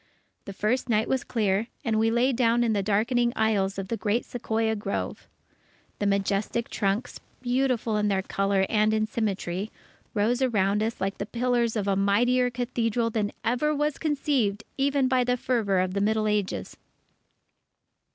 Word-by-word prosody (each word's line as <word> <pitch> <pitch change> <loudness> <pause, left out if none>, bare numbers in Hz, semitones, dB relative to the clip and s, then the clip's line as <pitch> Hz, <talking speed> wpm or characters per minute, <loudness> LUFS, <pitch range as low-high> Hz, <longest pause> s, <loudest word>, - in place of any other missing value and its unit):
The 200 - -7
first 240 +6 -1
night 220 -1 +2
was 265 -1 0
clear, 210 -1 0 0.2
and 220 -2 +1
we 225 +1 +3
lay 240 +3 +2
down 240 -1 +2
in 230 -2 +1
the 205 - +1
darkening 235 +4 +1
aisles 200 -3 +1
of 195 -1 -5
the 230 - -1
great 220 +2 0
Sequoia 225 -2 -1
grove. 205 -1 -4 0.7
The 205 - 0
majestic 200 +3 0
trunks, 205 +3 -1 0.2
beautiful 245 -3 +1
in 210 0 +1
colour 195 0 +1
and 215 0 +2
in 215 0 +1
symmetry, 205 -3 -2 0.5
rose 235 +5 +1
round 205 -4 +2
us 225 +1 -2
like 195 +1 -2
the 200 - -3
pillars 240 -1 0
of 205 -2 -1
a 195 - +2
mightier 245 +6 +3
cathedral 235 -2 -1
than 215 -2 -1
ever 275 +6 +1
was 295 0 -1
conceived 270 -9 0
even 275 -1 +2
by 255 -1 +2
the 250 0 +1
fervour 225 -6 0
of 185 0 0
the 200 - 0
Middle 215 +1 +1
Ages. 210 -2 -2
220 Hz, 160 wpm, -26 LUFS, 205-245 Hz, 0.7 s, we